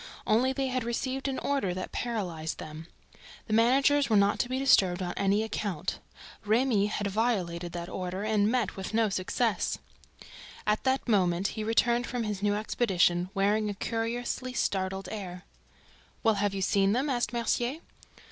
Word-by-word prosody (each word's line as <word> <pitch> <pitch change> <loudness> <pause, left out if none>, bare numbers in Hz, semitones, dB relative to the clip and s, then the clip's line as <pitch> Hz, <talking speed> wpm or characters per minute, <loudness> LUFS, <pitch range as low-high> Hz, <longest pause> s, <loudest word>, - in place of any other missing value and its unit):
Only 245 +5 +3
they 265 0 -1
had 255 -1 -1
received 260 +3 -2
an 270 - -2
order 270 -11 -1
that 185 - -5
paralyzed 180 -10 -3
them. 155 +1 -8 0.6
The 215 - -3
managers 270 +5 +4
were 220 - +3
not 200 0 +3
to 245 - 0
be 255 - -1
disturbed 195 -9 +4
on 175 - -3
any 200 +2 +2
account. 205 -6 -3 0.4
Remy 215 -1 +2
had 210 -1 -3
violated 190 -5 -1
that 170 0 -5
order 185 +1 -4
and 210 -1 +2
met 240 -5 0
with 190 +3 -5
no 225 -1 +3
success. 200 +4 0 0.9
At 210 +3 0
that 265 0 +1
moment 185 -4 +2
he 220 - -4
returned 235 +2 +2
from 245 -1 -2
his 210 -2 -3
new 205 0 +2
expedition, 185 -5 +1
wearing 210 +2 +2
a 205 - -4
curiously 240 +4 -3
startled 190 -4 -1
air. 185 -4 -6 0.8
"Well, 225 -2 +4
have 205 -1 0
you 195 - -1
seen 195 +1 +3
them?" 260 +5 +1
asked 240 -5 0
Mercier. 240 +3 0
215 Hz, 165 wpm, -29 LUFS, 190-240 Hz, 0.9 s, managers